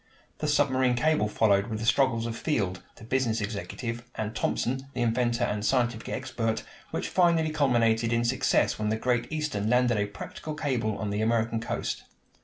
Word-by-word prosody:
The 150 - -1
submarine 130 -4 +3
cable 155 -3 +2
followed 100 -1 +3
with 110 -2 -3
the 110 - -4
struggles 120 -2 +3
of 115 -1 -3
Field, 100 - -1
the - - -14
business 120 -1 0
executive, 115 +3 -4
and 110 0 -3
Thomson, 130 +2 -1
the 125 - 0
inventor 120 +1 +1
and 105 -3 -1
scientific 120 0 +1
expert, 120 -4 -2 0.3
which - - -3
finally 170 -3 +3
culminated 120 -6 +2
in 115 0 +2
success 130 -1 +2
when 105 0 0
the 110 - +1
Great 120 +2 0
Eastern 150 -10 -1
landed 125 -2 +3
a 105 - 0
practical 150 +8 -7
cable 120 -8 -1
on 105 -2 -3
the 105 +1 -1
American 115 0 +1
coast. 115 - -3
120 Hz, 175 wpm, -28 LUFS, 110-130 Hz, 0.3 s, submarine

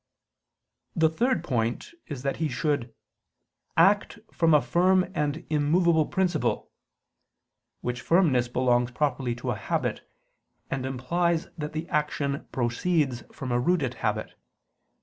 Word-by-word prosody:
The 160 -1 +4
third 245 +10 +1
point 120 -3 -1 0.2
is 135 -4 -6
that 140 - -1
he 160 -2 -1
should 130 -2 -1 0.9
"act 200 +6 +4 0.2
from 165 -2 +4
a - - +7
firm 185 +4 +3
and 150 0 -2
immovable 160 +1 +3
principle": 180 -5 0 1.1
which 125 0 -3
firmness 155 -9 +3
belongs 120 -1 +2
properly 130 -2 -1
to 125 +1 -3
a - - -1
habit, 100 - -2 0.7
and 130 -1 -2
implies 165 +6 0
that 150 -1 -5
the 160 +2 -4
action 150 -3 -1
proceeds 130 +1 0
from 130 -2 -6
a 120 - +2
rooted 140 -2 +1
habit. - - -1
150 Hz, 125 wpm, -27 LUFS, 125-170 Hz, 1.1 s, a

